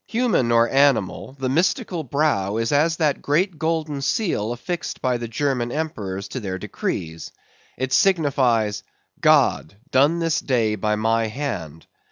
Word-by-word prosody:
Human 225 Hz, -, +1 dB
or 115 Hz, 0 st, +4 dB
animal, 125 Hz, -7 st, +1 dB
the 130 Hz, -, -1 dB
mystical 175 Hz, -, 0 dB
brow 120 Hz, -8 st, 0 dB
is 115 Hz, 0 st, -1 dB
as 160 Hz, +3 st, +2 dB
that 150 Hz, -4 st, +1 dB
great 165 Hz, +3 st, 0 dB
golden 160 Hz, -3 st, -1 dB
seal 135 Hz, -, -1 dB
affixed 170 Hz, +9 st, -4 dB
by 125 Hz, -1 st, 0 dB
the 120 Hz, 0 st, -5 dB
German 120 Hz, 0 st, -1 dB
emperors 100 Hz, -11 st, -4 dB
to 130 Hz, -, -4 dB
their 95 Hz, -5 st, -4 dB
decrees. 80 Hz, -3 st, -4 dB, 0.5 s
It 130 Hz, 0 st, -2 dB
signifies—"God: 125 Hz, -, +1 dB, 0.2 s
done 145 Hz, +6 st, +4 dB
this 165 Hz, -2 st, 0 dB
day 115 Hz, -5 st, +1 dB
by 105 Hz, +1 st, 0 dB
my 115 Hz, +1 st, +1 dB
hand." 105 Hz, -, -5 dB
130 Hz, 140 wpm, -22 LUFS, 110-155 Hz, 0.5 s, or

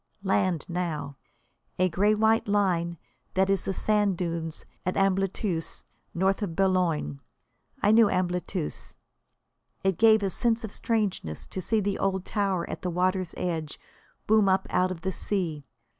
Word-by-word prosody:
Land 185 Hz, -4 st, +1 dB
now 160 Hz, -6 st, -3 dB, 0.6 s
a 185 Hz, -, +3 dB
grey 200 Hz, +5 st, +2 dB
white 220 Hz, +1 st, +3 dB
line 180 Hz, -4 st, +1 dB, 0.4 s
that 190 Hz, +1 st, +3 dB
is 195 Hz, -, 0 dB
the 195 Hz, -, -1 dB
sand 205 Hz, -3 st, +1 dB
dunes 165 Hz, -2 st, -4 dB, 0.2 s
at 185 Hz, -, -2 dB
Ambleteuse, 195 Hz, -2 st, 0 dB, 0.3 s
north 190 Hz, +3 st, +1 dB
of 180 Hz, -6 st, -3 dB
Boulogne. 175 Hz, -, +1 dB, 0.6 s
I 205 Hz, -, +5 dB
knew 220 Hz, -1 st, +6 dB
Ambleteuse. 180 Hz, -2 st, -2 dB, 0.9 s
It 190 Hz, -3 st, +1 dB
gave 220 Hz, -2 st, +6 dB
a 195 Hz, -, 0 dB
sense 230 Hz, +4 st, 0 dB
of 220 Hz, -, -5 dB
strangeness 210 Hz, -, -2 dB
to 190 Hz, -, -5 dB
see 220 Hz, +4 st, +1 dB
the 200 Hz, 0 st, -1 dB
old 190 Hz, -1 st, 0 dB
tower 195 Hz, -4 st, -1 dB
at -, -, -6 dB
the 180 Hz, -, -2 dB
water's 185 Hz, 0 st, 0 dB
edge 160 Hz, -4 st, -3 dB, 0.5 s
loom 215 Hz, -2 st, +4 dB
up 190 Hz, 0 st, +2 dB
out 185 Hz, 0 st, +2 dB
of 180 Hz, -3 st, -6 dB
the 190 Hz, 0 st, -1 dB
sea. 165 Hz, -8 st, -2 dB
190 Hz, 150 wpm, -27 LUFS, 170-205 Hz, 0.9 s, knew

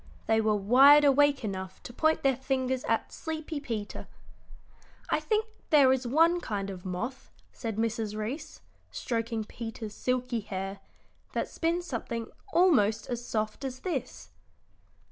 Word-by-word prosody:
They 220 Hz, 0 st, +3 dB
were 215 Hz, -1 st, +2 dB
wide 270 Hz, +9 st, +7 dB
awake 285 Hz, -2 st, +4 dB
enough 190 Hz, -2 st, -5 dB
to 240 Hz, -, -9 dB
point 315 Hz, +5 st, +2 dB
their 270 Hz, -1 st, +4 dB
fingers 260 Hz, 0 st, -1 dB
at 225 Hz, -, 0 dB
sleepy 315 Hz, -1 st, -4 dB
Peter. 225 Hz, -7 st, -5 dB, 1.0 s
"I -, -, +3 dB
think 435 Hz, 0 st, 0 dB, 0.2 s
there 275 Hz, -4 st, +6 dB
is 260 Hz, -1 st, -2 dB
one 330 Hz, +7 st, +4 dB
kind 200 Hz, -, -3 dB
of 180 Hz, -2 st, -9 dB
moth," 230 Hz, +9 st, -4 dB, 0.2 s
said 225 Hz, -3 st, -4 dB
Mrs. 220 Hz, -1 st, -1 dB
Reece, 275 Hz, +9 st, -5 dB, 0.3 s
stroking 230 Hz, -2 st, -2 dB
Peter's 225 Hz, -1 st, -7 dB
silky 250 Hz, -1 st, -1 dB
hair, 195 Hz, -1 st, -5 dB, 0.5 s
"that -, -, -1 dB
spins 340 Hz, +2 st, -1 dB
something 235 Hz, -5 st, -4 dB, 0.3 s
almost 235 Hz, -, +3 dB
as 240 Hz, 0 st, -3 dB
soft 215 Hz, +1 st, -2 dB
as 260 Hz, -1 st, -5 dB
this." 275 Hz, -10 st, -4 dB
245 Hz, 140 wpm, -29 LUFS, 215-285 Hz, 1.0 s, wide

